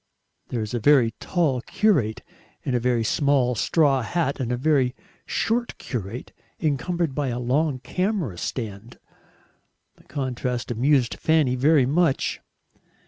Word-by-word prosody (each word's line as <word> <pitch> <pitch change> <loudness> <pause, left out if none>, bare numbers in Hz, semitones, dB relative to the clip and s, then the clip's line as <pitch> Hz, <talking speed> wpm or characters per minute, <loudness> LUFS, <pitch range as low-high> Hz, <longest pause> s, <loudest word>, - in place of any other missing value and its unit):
There 120 - -3
was 110 +2 -5
a 120 - 0
very 125 -2 +5
tall 155 -9 0
curate 145 - +1 0.4
in 130 - -2
a 125 - +2
very 120 -1 +1
small 135 +1 +2
straw 135 +3 +2
hat, 140 +4 -1
and 125 -2 -2
a 125 - 0
very 135 -2 +2 0.3
short 235 +1 -1
curate 115 0 -6 0.3
encumbered 160 +1 -1
by 145 0 -1
a 120 -1 -2
long 135 +4 +1
camera 180 - -2
stand. 110 -1 -5 1.0
The - - -21
contrast 125 -3 -3
amused 125 +1 +2
Fanny 155 -5 +3
very 140 +1 +4
much. 150 +1 +1
130 Hz, 135 wpm, -24 LUFS, 120-155 Hz, 1.0 s, very